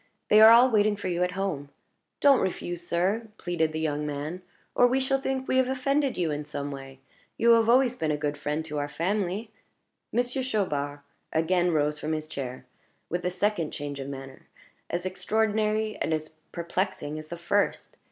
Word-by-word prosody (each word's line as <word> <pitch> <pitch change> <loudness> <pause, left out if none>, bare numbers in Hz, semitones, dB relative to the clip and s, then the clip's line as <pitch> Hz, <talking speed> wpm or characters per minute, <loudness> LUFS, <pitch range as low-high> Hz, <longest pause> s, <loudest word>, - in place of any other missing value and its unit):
They 215 +1 +7
are 220 - +11
all 240 +3 +7
waiting 210 -1 +3
for 200 -2 -4
you 175 0 -1
at 180 0 +1
home. 180 -8 -3 0.5
Don't 280 -2 +6
refuse, 175 -2 -3
sir," 195 +7 0
pleaded 165 -3 -1
the 155 - -3
young 150 -2 -1
man, 150 +4 -4 0.3
"or 245 - +5
we 255 +2 +1
shall 270 0 +1
think 265 -1 -2
we 260 - +2
have 260 -1 +3
offended 275 +1 0
you 170 -3 0
in 150 0 -3
some 145 -1 -5
way. 135 -1 -9 0.4
You 235 +1 +5
have 230 -1 +5
always 250 0 +4
been 160 -9 -2
a 150 - +1
good 145 0 -2
friend 150 +2 -3
to 150 -2 -3
our 145 0 -2
family 200 +5 -2 0.3
" - - -53
Monsieur 245 +2 0
Chaubard 145 - -2 0.3
again 175 +2 +2
rose 150 -2 +1
from 155 +2 -2
his 155 0 -2
chair, 130 -4 -6 0.4
with 175 +1 -2
a - - +2
second 185 -3 -1
change 145 -1 -5
of 135 0 -5
manner, 135 -1 -9 0.4
as 175 +1 -2
extraordinary 215 +2 0
and 160 - 0
as 155 0 -5 0.2
perplexing 170 -3 -3
as 155 - -9
the 170 - -6
first. 185 +4 0
175 Hz, 190 wpm, -27 LUFS, 150-220 Hz, 0.5 s, are